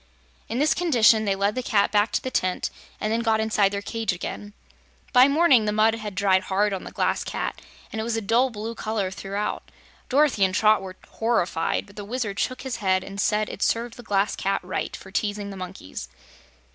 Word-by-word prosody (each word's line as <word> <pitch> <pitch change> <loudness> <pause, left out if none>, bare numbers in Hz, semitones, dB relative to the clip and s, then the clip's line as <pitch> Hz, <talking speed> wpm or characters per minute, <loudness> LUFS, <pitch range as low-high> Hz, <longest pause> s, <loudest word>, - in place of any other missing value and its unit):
In 230 - -2
this 300 +3 +3
condition 235 -10 +4
they 195 -1 +1
led 200 +1 +1
the 255 - -2
pussy 210 -5 +2
back 210 +1 +2
to - - +1
the 260 - -3
tent 185 -5 -1 0.3
and 215 +1 -1
then 230 - +1
got 225 -2 +2
inside 215 -2 +2
their 200 0 -3
cage 225 -1 -2
again. 205 +3 -6 0.6
By 255 +1 +8
morning 280 -6 +4
the 210 - +1
mud 215 +1 +3
had 215 -3 -5
dried 190 -1 +2
hard 200 +2 +1
on 190 - -4
the - - -8
Glass - - 0
Cat - - -4 0.3
and 220 - -3
it - - -2
was 225 0 -1
a - - -1
dull 235 +6 +3
blue 225 0 -5
color 215 -4 -2
throughout. 200 +2 -4 0.4
Dorothy 270 -6 +3
and 185 -1 +2
Trot 215 0 +4
were 190 -1 -8
horrified, 220 -8 0
but 200 - -18
the 205 - -5
Wizard 210 -2 -3
shook 255 0 -2
his 265 -2 -3
head 185 -2 +1
and 195 +1 -5
said 210 0 +1
it - - -8
served 230 0 0
the - - -10
Glass 205 -3 0
Cat 195 +1 0
right 185 +1 -3
for 190 - -12
teasing 205 0 -2
the - - -7
monkeys. 180 - -7
210 Hz, 215 wpm, -25 LUFS, 195-230 Hz, 0.6 s, By